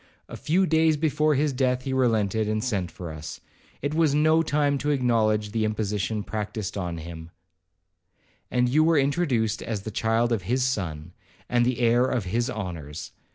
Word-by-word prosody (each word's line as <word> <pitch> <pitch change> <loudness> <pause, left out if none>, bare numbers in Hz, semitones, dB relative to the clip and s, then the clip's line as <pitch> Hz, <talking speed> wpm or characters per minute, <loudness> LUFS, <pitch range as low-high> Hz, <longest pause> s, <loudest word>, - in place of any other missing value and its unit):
A - - -8
few 180 +5 +1
days 160 -1 +3
before 155 0 +2
his 145 +1 +1
death 130 -1 0
he 135 - -3
relented, 110 -4 +1
and 110 0 -1
sent 100 -8 -1
for 85 -2 -8
us; 75 0 -8 0.4
it 145 +1 -1
was 155 -3 +2
no 155 +2 +4
time 145 -3 +1
to 145 - -2
acknowledge 110 -6 +1
the 110 0 0
imposition 105 0 -1
practised 105 -2 -4
on 90 -4 -3
him, 80 0 -8 1.2
and 125 0 +2
you 150 +6 +3
were 165 0 +3
introduced 135 - +1
as 105 -4 -4
the 110 - -5
child 115 +3 +1
of 115 -4 +1
his 125 +8 0
son, 90 -10 -3 0.3
and 120 0 +2
the 125 -1 -1
heir 120 +1 +4
of 125 -6 -1
his 120 +7 -1
honours. 85 - -6
120 Hz, 175 wpm, -25 LUFS, 105-140 Hz, 1.2 s, no